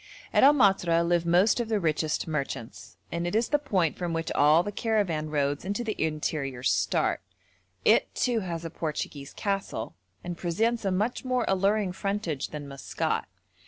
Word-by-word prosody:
At - - +5
El 285 +2 +8
Matra 175 -8 +3
live 170 -1 +1
most 180 +8 +4
of 235 -2 -2
the 215 -2 +1
richest 155 -2 0
merchants, 140 -7 -5
and 170 +1 -2
it 175 - -2
is 230 +1 +2
the 295 - +3
point 190 - 0
from 175 -2 -2
which 165 0 -2
all 150 +4 +5
the 205 - -4
caravan 200 -9 0
roads 145 -1 0
into 205 +5 -2
the 220 -2 -3
interior 150 -5 -2
start; - - +1 0.6
it, - - +4
too, 245 -3 +1
has 170 -4 -4
a 165 - -5
Portuguese 150 -3 -4
castle, 195 - -3 0.3
and 175 -1 -5
presents 220 +6 0
a 195 - +1
much 210 +6 -1
more 255 -2 0
alluring 195 +1 +2
frontage 190 -6 -2
than 150 -2 -7
Maskat. 140 -1 -2
175 Hz, 170 wpm, -27 LUFS, 155-210 Hz, 0.6 s, El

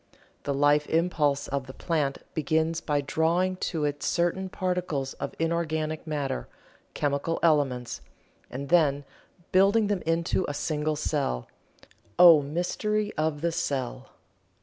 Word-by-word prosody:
The 140 - 0
life 145 +1 +3
impulse 150 -4 +1
of 140 -1 -3
the 130 - -10
plant 150 -5 -1
begins 160 +2 0
by 145 -2 0
drawing 170 +6 +1
to 160 -4 -2
it 145 -1 -2
certain 175 +2 0
particles 180 -8 -2
of - - -5
inorganic 160 -1 -1
matter 140 - -2 0.5
chemical 145 +3 -1
elements 140 -7 +1 0.5
and 140 +2 -6
then 145 -5 +3 0.5
building 200 +4 +4
them 200 -3 0
into 165 +3 +1
a 145 - -3
single 155 0 -1
cell. 145 - -1 0.7
Oh, 170 -4 +9
mystery 205 +8 -1
of 155 -1 -1
the 170 0 +1
cell! 130 - -3
155 Hz, 125 wpm, -27 LUFS, 145-170 Hz, 0.7 s, Oh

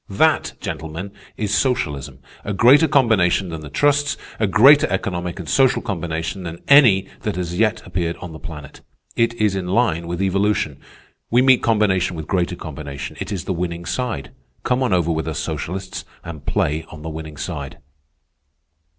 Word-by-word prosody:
That, 155 +10 +2
gentlemen, 80 +5 -5 0.3
is 105 -1 -1
socialism, 75 - -1 0.2
a 105 - -3
greater 130 +10 +6
combination 110 - +3
than 80 -1 -6
the 75 - -9
trusts, 145 - +2 0.2
a 110 - +2
greater 135 +10 +6
economic 90 -2 -2
and 90 -4 -7
social 135 -1 +3
combination 80 -2 -3
than 85 -1 -7
any 120 -10 +6
that - - -3
has 90 -1 -3
as 90 - -4
yet 110 0 +1
appeared 85 -1 -2
on 90 - -8
the 80 - -9
planet. 75 -4 -10 0.3
It 115 0 +1
is 105 -3 +1
in 95 -2 -3
line 90 -5 +1
with 85 0 -4
evolution. 95 -6 0 0.5
We 120 +2 +4
meet 130 -1 +5
combination 95 -5 +2
with 80 -1 -6
greater 90 +1 0
combination. 70 -4 -7
It 105 - -5
is 95 -4 -4
the 95 - -1
winning 85 -1 -4
side. 90 - -3 0.3
Come 125 +1 +1
on 130 - +1
over 85 -2 +2
with 80 0 -2
us 80 -3 -3
socialists 95 +2 -4 0.2
and 80 -4 -9
play 75 +2 0
on 80 -1 -11
the 80 - -4
winning 80 -1 -8
side." 70 -1 -5
90 Hz, 175 wpm, -21 LUFS, 80-110 Hz, 0.5 s, greater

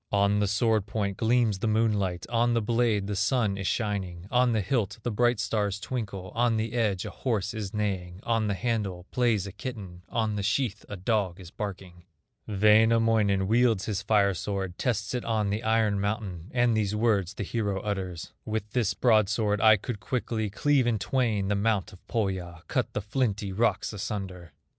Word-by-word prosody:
On 100 0 +3
the 105 - +2
sword 105 0 +1
point 100 -3 -2
gleams 115 -3 +2
the 110 - -1
moonlight, 105 -5 +1
On 120 0 +2
the 115 - +2
blade 115 -3 +1
the 105 0 -3
sun 105 0 +1
is 100 -1 -3
shining, 95 -6 -2
On 125 0 +4
the 110 -2 +1
hilt 110 -1 -1
the 120 - -1
bright 120 +1 +2
stars 105 -1 -1
twinkle, 100 -6 -5
On 115 -1 +2
the 110 +1 -2
edge 105 -6 0
a - - -5
horse 105 -6 -2
is 105 -3 -4
neighing, 95 -4 -3
On 115 -2 +1
the 100 - 0
handle 100 -6 -2
plays 115 -6 +1
a 100 - -6
kitten, 100 -5 -7
On 110 -2 -1
the - - -1
sheath 105 +1 0
a 105 - -5
dog 95 -2 0
is 90 -2 -11
barking. 90 -4 -7 0.4
Wainamoinen 110 -1 +4
wields 115 -2 +3
his 100 -3 -2
fire 100 -1 +3
sword, 95 0 -4
Tests 110 -4 -1
it 125 - -2
on 110 -3 0
the 105 +2 -1
iron 110 -3 +2
mountain, 100 -4 -3
And 120 -2 +2
these 105 -1 0
words 105 -4 +1
the - - -3
hero 100 -1 -1
utters: 95 -5 -4
"With 110 -1 -3
this 115 -5 0
broadsword 110 -2 +2
I 110 -1 +7
could 105 +2 -5
quickly 110 0 -2
Cleave 135 +4 +2
in 115 -2 +2
twain 110 -3 0
the 105 - +1
mount 100 -2 0
of 95 - -13
Pohya, 95 -7 -2
Cut - - -1
the - - -1
flinty 105 -2 -1
rocks 110 +3 0
asunder." 95 -4 -5
105 Hz, 185 wpm, -27 LUFS, 100-115 Hz, 0.4 s, I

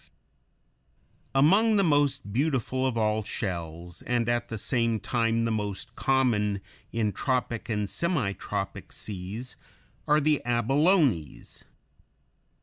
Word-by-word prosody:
] 60 +1 -45 0.5
Among 200 +11 +5
the 200 - +4
most 145 - +1
beautiful 130 -1 0
of 125 -3 -2
all 110 -1 +1
shells, 85 -5 -5
and 120 -1 0
at 120 0 0
the 115 - -4
same 115 0 0
time 115 0 0
the 115 - 0
most 105 -3 -3
common 115 -7 +1 0.3
in 110 -2 0
tropic 125 -1 -2
and 105 -2 0
semitropic 140 - -2
seas, 105 +5 -6 0.5
are 150 +1 +5
the 150 -1 +2
abalones. 125 - +1
120 Hz, 115 wpm, -27 LUFS, 105-135 Hz, 0.5 s, Among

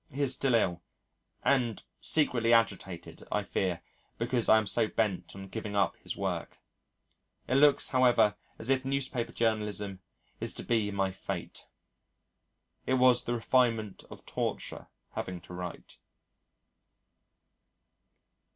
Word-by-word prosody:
He 140 +2 -1
is 135 -2 +2
still 130 -1 +2
ill, 90 -6 +1 0.6
and 120 -5 +2 0.2
secretly 120 -7 +2
agitated, 100 -6 0
I 105 - +1
fear, 90 -3 -1 0.3
because 120 0 0
I 110 - +8
am 110 - +1
so 110 +3 +2
bent 105 -5 -1
on 95 0 -8
giving 105 0 -5
up 100 -1 +2
his - - -6
work. - - -3 0.9
It - - 0
looks, 145 0 +5
however, 125 -5 +4 0.2
as 115 +4 -2
if 130 -1 +2
newspaper 135 -3 -1
journalism 105 -4 -1 0.4
is - - -1
to - - -4
be 110 -3 +1
my 100 -1 0
fate. 95 - -6 1.2
It 130 - +3
was 125 -1 +5
the 120 - 0
refinement 115 -3 +1
of - - -12
torture - - -3 0.2
having 90 -1 -4
to - - -12
write. 90 -1 -7
115 Hz, 130 wpm, -30 LUFS, 100-125 Hz, 1.2 s, I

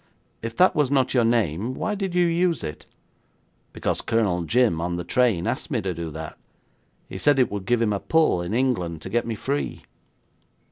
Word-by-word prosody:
'If 115 0 -5
that 185 +1 +5
was 150 -4 +2
not 135 -2 +2
your 125 -2 +3
name, 115 0 0
why 215 - -2
did 195 -3 -3
you 180 -1 +4
use 170 0 +1
it?' 75 -1 -7 0.8
'Because - - -2
Colonel 105 -7 +1
Jim, 115 -6 +2
on 85 +1 -2
the 85 - -3
train, 110 -2 +1
asked - - -2
me - - 0
to 95 -1 -2
do 85 -1 -5
that. 80 +1 -8 0.7
He 95 - -7
said 145 +3 +3
it 130 - +3
would 100 -2 -5
give 120 -1 +2
him 105 -2 +1
a 100 - -1
pull 160 - +2
in 85 +2 -4
England 90 -11 -1
to 95 - -7
get 120 +1 0
me 115 - -2
free.' 140 +6 -3
115 Hz, 200 wpm, -24 LUFS, 90-135 Hz, 0.8 s, that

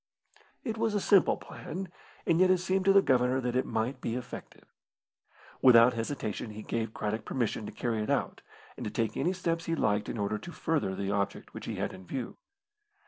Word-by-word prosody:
It 225 -3 -3
was 225 -2 +1
a - - +3
simple 195 -1 +4
plan, 185 +4 -7 0.4
and 165 - +3
yet 185 0 +6
it 185 - +5
seemed 185 +1 0
to 195 - +6
the 195 0 +6
Governor 125 0 +3
that 125 -1 -2
it 130 - +1
might 120 +3 -1
be 115 - -2
effective. 125 0 -8 1.0
Without 125 -1 +8
hesitation 115 -2 -3
he 105 0 -8
gave 115 -1 -2
Craddock 110 +1 -2
permission 110 -4 -2
to - - -6
carry 115 -3 -1
it 105 - -3
out, - - 0 0.3
and - - -7
to - - -2
take 110 0 -1
any 180 - +1
steps 165 -3 -1
he 165 - 0
liked 105 -7 +1
in - - -4
order 105 0 -1
to 175 - -9
further 150 - -1
the 100 0 -2
object 100 -1 -2
which - - -8
he - - -3
had - - -2
in 95 -1 -12
view. 130 - -4
125 Hz, 205 wpm, -30 LUFS, 110-170 Hz, 1.0 s, Without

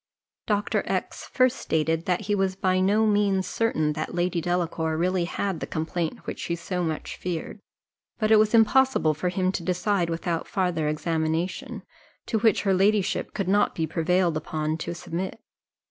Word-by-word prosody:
Dr. 205 -1 +1
X - - -3
first 255 -1 +3
stated 160 +1 0
that 180 +1 +1
he 205 0 -1
was 195 -2 +1
by 185 -2 +1
no 205 +4 +3
means 205 -3 +2
certain 155 -10 0
that 155 +2 -4
Lady 175 -1 0
Delacour 165 -2 -1
really 180 +1 +1
had 190 0 -2
the - - -5
complaint 160 +1 -3
which - - -5
she 170 - -2
so 180 +1 -3
much 160 -2 -4
dreaded; 180 +3 -4 0.6
but 215 -1 0
it 220 - +8
was 215 +1 +4
impossible 225 -7 +4
for 180 +4 -2
him 185 +1 0
to 190 - -3
decide 180 +1 0
without 165 0 -2
farther 180 -6 0
examination, 160 +3 -2 0.4
to 220 - 0
which 220 -1 +3
her 195 -2 +2
ladyship 200 +1 +1
could 195 -3 -2
not 205 +2 +2
be 160 - 0
prevailed 170 +1 +1
upon 155 0 -2
to 170 +2 -4
submit. 180 +4 -5
180 Hz, 170 wpm, -25 LUFS, 165-200 Hz, 0.6 s, it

